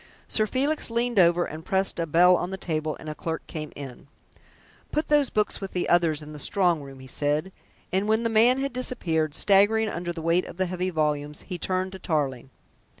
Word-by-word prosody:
Sir 215 -1 +1
Felix 280 +6 0
leaned 235 -1 +1
over 175 0 +4
and 155 +1 -8
pressed 190 0 0
a 165 - -1
bell 180 +4 +6
on 175 0 -2
the 190 - -4
table, 155 -4 -3
and - - -10
a 155 - -3
clerk 160 +1 -5
came 155 -2 -6
in. 135 -2 -9 0.8
"Put 305 - -1
those 295 -3 +4
books 210 -1 -1
with 195 - -6
the 180 - -1
others 165 -3 +2
in 150 0 -10
the 150 - -8
strong 175 -1 +2
room," 135 -1 -11
he 130 - -11
said, 150 +6 -1 0.4
and 195 +2 +1
when 220 +2 +2
the - - +2
man 230 +3 +4
had 275 -1 -2
disappeared, 160 -12 -1
staggering 210 +4 +4
under 175 -1 -4
the 165 -2 -7
weight 170 +2 +2
of - - -10
the 185 - +1
heavy 185 +1 -2
volumes 150 -2 -1
he 180 - -6
turned 185 +1 -1
to 190 - -9
Tarling. 135 -7 -2
175 Hz, 210 wpm, -26 LUFS, 155-205 Hz, 0.8 s, bell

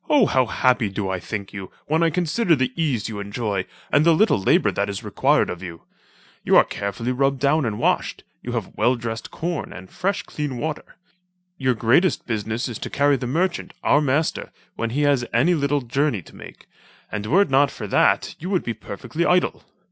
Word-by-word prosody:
how 135 - +4
happy 125 -3 +2
do 95 0 -3
I 95 - -2
think 100 +1 -6
you, 95 -2 -7 0.2
when 160 +2 +1
I 165 - +4
consider 175 +2 +1
the 130 -2 -1
ease 145 -10 -1
you 110 -3 -6
enjoy, 100 -1 -3 0.2
and 145 - +4
the 165 0 +5
little 215 - +3
labour - - +3
that 100 +1 -1
is 100 - -5
required - - +2
of 90 - -6
you. 85 -3 -8 0.6
You - - +5
are - - +8
carefully 100 +5 -4
rubbed 135 +1 +1
down 140 0 +2
and 105 -2 -3
washed, - - 0 0.2
you - - -5
have - - -4
well 120 +4 +2
dressed 115 -1 -5
corn, 170 -2 -4
and 95 0 -11
fresh 195 +2 -1
clean 145 -4 -4
water. 155 +4 -5 0.6
Your 130 -2 +1
greatest 125 - +2
business 110 +2 -2
is 120 -4 -6
to - - -5
carry 145 0 +3
the 125 -2 -4
merchant, 175 +6 -1
our 145 - +4
master, 150 +2 0 0.2
when 115 - -2
he 140 +6 0
has 140 -4 +3
any 150 +10 +4
little 145 -2 +1
journey 125 - -1
to - - -16
make, - - -13 0.4
and 105 0 -4
were 185 - +5
it 200 - -8
not 140 +1 +4
for 110 - -7
that 100 - +2
you 180 - -5
would 185 -3 +1
be 115 - -3
perfectly 110 - -5
idle. 180 +1 +1
130 Hz, 200 wpm, -22 LUFS, 110-155 Hz, 0.6 s, are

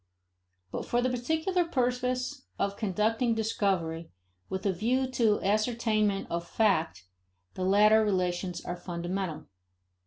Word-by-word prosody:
But - - -3
for 240 - 0
the 255 +1 +1
particular 320 +9 0
purpose 255 -2 -1
of 200 0 -1
conducting 225 +4 +1
discovery 190 -7 -1 0.4
with 190 - -4
a 195 - +2
view 245 +8 +1
to 225 -4 +2
ascertainment 215 -1 +1
of 170 0 -2
fact, 165 - +1 0.5
the 185 - -4
latter 210 +3 +5
relations 180 -3 -1
are 175 - -3
fundamental. 175 -2 -4
210 Hz, 120 wpm, -29 LUFS, 185-245 Hz, 0.5 s, latter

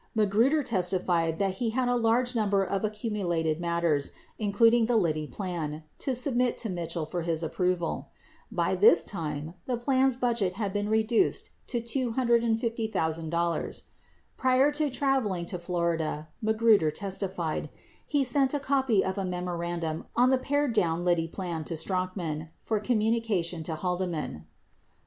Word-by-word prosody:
Magruder 225 +8 +3
testified 180 -7 +1
that 190 0 0
he 235 - +1
had 250 +2 0
a 245 - +2
large 240 +2 +2
number 205 -4 +2
of 195 +1 -2
accumulated 195 -7 -1
matters, 170 -4 0 0.3
including 225 +2 +4
the 240 - +2
Liddy 155 -6 0
plan, 160 -6 -4 0.2
to 265 - -1
submit 250 -1 +1
to 225 - -3
Mitchell 170 -2 -3
for 175 +3 -3
his 165 -1 -1
approval. 180 +1 -1 0.4
By - - 0
this 450 +3 +6
time, 155 -3 -4
the 250 -2 0
plan's 260 +1 +2
budget 235 -7 0
had 200 -1 -3
been 205 0 -1
reduced 220 +1 +2 0.2
to 240 - -1
$250,000. 230 - 0
92 170 +1 -1 0.6
Prior 260 +2 +4
to 295 0 0
traveling 255 -10 0
to 180 0 -5
Florida, 170 -3 -2
Magruder 220 -6 +4
testified, 190 -2 -3 0.4
he 290 -2 +2
sent 270 +2 +2
a - - 0
copy 265 -7 +2
of 190 +1 -2
a - - -1
memorandum 175 -3 -3
on 250 +2 +4
the 260 - +3
pared 285 -1 0
down 175 -4 +1
Liddy 170 -2 +2
plan 170 -2 -4
to 165 - -4
Strachan 180 -4 -3
for 220 -2 -1
communication 215 -6 0
to 160 0 -3
Haldeman. 175 - -3
195 Hz, 145 wpm, -28 LUFS, 170-235 Hz, 0.6 s, this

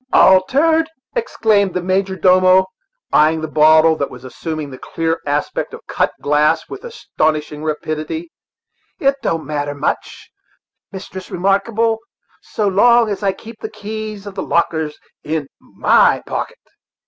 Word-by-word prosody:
"Altered!" 310 - +4 0.3
exclaimed 220 - +1
the 180 - 0
major 190 +1 0
domo, 185 +1 +5 0.5
eyeing 155 +1 +4
the 160 - -3
bottle, 155 +1 +5
that 140 - -2
was 125 0 -12
assuming 150 +3 -6
the 130 - -10
clear 165 0 -2
aspect 145 +1 -2
of - - -15
cut - - 0
glass 150 +2 +2
with - - -9
astonishing 155 - -2
rapidity; 155 - -4 0.7
"it 275 0 +3
don't 165 -1 -2
matter 145 -1 -3
much, 145 - -4 0.6
Mistress 190 -1 -8
Remarkable, 215 +4 +1 0.4
so 210 - -2
long 235 +4 +4
as 205 - -3
I 200 -1 +2
keep 225 +3 -12
the - - -4
keys 215 -1 -7
of 200 - -7
the 190 - -4
lockers 160 -3 -1 0.3
in 155 -1 -2
my - - +2
pocket." - - -4
185 Hz, 135 wpm, -18 LUFS, 155-210 Hz, 0.7 s, domo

